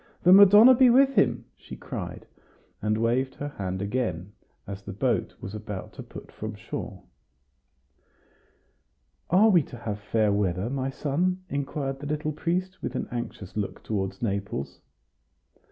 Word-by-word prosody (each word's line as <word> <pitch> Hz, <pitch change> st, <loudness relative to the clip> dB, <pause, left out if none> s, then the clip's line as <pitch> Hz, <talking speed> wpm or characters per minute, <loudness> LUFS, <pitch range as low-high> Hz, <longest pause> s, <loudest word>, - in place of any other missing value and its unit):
The 180 Hz, -, +7 dB
Madonna 205 Hz, +5 st, +9 dB
be 255 Hz, 0 st, +6 dB
with 270 Hz, +3 st, +5 dB
him!" 205 Hz, -, +2 dB
she -, -, -11 dB
cried, -, -, -7 dB, 0.6 s
and 105 Hz, +1 st, 0 dB
waved 120 Hz, +4 st, 0 dB
her 145 Hz, -, -5 dB
hand 95 Hz, -7 st, -4 dB
again, 100 Hz, -4 st, -3 dB, 0.3 s
as 100 Hz, 0 st, -7 dB
the 100 Hz, -1 st, -8 dB
boat 100 Hz, -, -1 dB
was 95 Hz, -, -7 dB
about 105 Hz, -3 st, -7 dB
to -, -, -8 dB
put -, -, -11 dB
from -, -, -6 dB
shore. -, -, -7 dB, 2.3 s
"Are 200 Hz, +6 st, +5 dB
we 175 Hz, -4 st, +6 dB
to 125 Hz, -, -10 dB
have 105 Hz, -3 st, -4 dB
fair 105 Hz, 0 st, +1 dB
weather, 100 Hz, +2 st, 0 dB
my 135 Hz, -1 st, -2 dB
son?" 175 Hz, +7 st, -1 dB
inquired 140 Hz, -1 st, -3 dB
the 145 Hz, -, -6 dB
little 150 Hz, +1 st, -2 dB
priest, 180 Hz, +4 st, -2 dB
with -, -, -4 dB
an -, -, -3 dB
anxious 120 Hz, -5 st, -6 dB
look 105 Hz, -2 st, -4 dB
toward 95 Hz, -3 st, -3 dB
Naples. 100 Hz, -, -3 dB
125 Hz, 150 wpm, -26 LUFS, 100-170 Hz, 2.3 s, Madonna